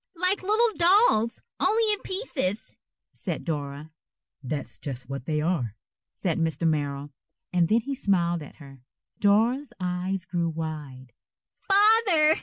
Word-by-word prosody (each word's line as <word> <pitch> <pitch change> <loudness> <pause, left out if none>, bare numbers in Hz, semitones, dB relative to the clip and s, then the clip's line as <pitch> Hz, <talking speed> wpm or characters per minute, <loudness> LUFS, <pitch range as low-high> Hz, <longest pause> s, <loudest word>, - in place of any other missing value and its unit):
"Like 365 +3 +1
little 430 +3 +2
dolls, 345 - +4 0.2
only 440 -1 +3
in 415 - -3
pieces," 295 - -3 0.4
said - - -5
Dora. 145 -1 -4 0.5
"That's 135 -3 -5
just 130 -3 -6
what 135 -1 -6
they 150 -1 0
are," 150 - -1 0.4
said - - -2
Mr. 165 0 0
Merrill, 145 -2 -2 0.4
and 175 -2 +3
then 225 +6 +3
he 275 +5 -4
smiled 175 -9 +1
at 150 - -11
her. 135 -4 -14 0.4
Dora's 235 +6 +2
eyes 180 +1 -2
grew 170 -2 -1
wide. 150 -6 -6 0.6
"_Father! 395 -6 +5
180 Hz, 130 wpm, -26 LUFS, -, 0.6 s, Father